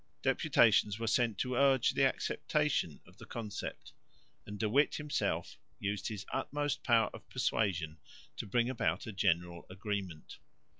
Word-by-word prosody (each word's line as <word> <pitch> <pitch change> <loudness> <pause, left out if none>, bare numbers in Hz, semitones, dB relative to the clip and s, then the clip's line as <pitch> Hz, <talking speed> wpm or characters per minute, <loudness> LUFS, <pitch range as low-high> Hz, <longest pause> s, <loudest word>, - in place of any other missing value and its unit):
Deputations 105 -1 +4
were 115 - -3
sent 115 -1 +2
to 125 - -1
urge 135 -1 +4
the 135 - +1
acceptation 145 - 0
of - - -19
the - - -10
Concept; 110 -3 -6 0.5
and 105 - -6
De 110 - 0
Witt 140 +8 +3
himself 150 -1 -2 0.2
used 100 0 -2
his 105 -3 -5
utmost 145 -1 -2
power 115 -2 +3
of - - -12
persuasion 85 -7 -1 0.4
to - - -5
bring 120 +4 +2
about 130 -2 -1
a 110 - -5
general 85 -3 0
agreement. 95 -4 -5
110 Hz, 145 wpm, -33 LUFS, 95-125 Hz, 0.5 s, Deputations